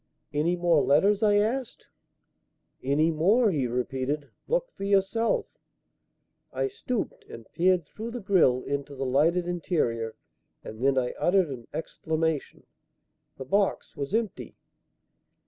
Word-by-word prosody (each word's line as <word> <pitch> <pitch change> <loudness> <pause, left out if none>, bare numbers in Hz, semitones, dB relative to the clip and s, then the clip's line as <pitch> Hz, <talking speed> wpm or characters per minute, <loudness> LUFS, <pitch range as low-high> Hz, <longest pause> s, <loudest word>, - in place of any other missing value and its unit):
"Any 155 +4 +1
more 175 -3 +3
letters?" 195 +9 +3
I 210 -2 +4
asked. 225 +5 -1 1.0
"Any 150 +5 +2
more!" 200 +8 +3
he 140 -7 0
repeated. 130 +4 -2 0.2
"Look - - 0
for - - -9
yourself." 200 +3 +2 1.1
I - - -1
stooped 250 - -4
and 115 - -10
peered 180 -1 +2
through 220 +9 -7
the 245 +1 -5
grille 180 - +3
into 140 0 -4
the 135 0 -3
lighted 165 +7 +2
interior; 120 -11 -1 0.5
and 110 +3 -8
then 135 0 +3
I 125 -1 0
uttered 180 -4 +3
an 120 -3 -8
exclamation. 160 -2 -3 0.7
The 135 - -7
box 200 +8 0
was 140 -2 -4
empty. 225 -1 -2
165 Hz, 130 wpm, -27 LUFS, 140-200 Hz, 1.1 s, I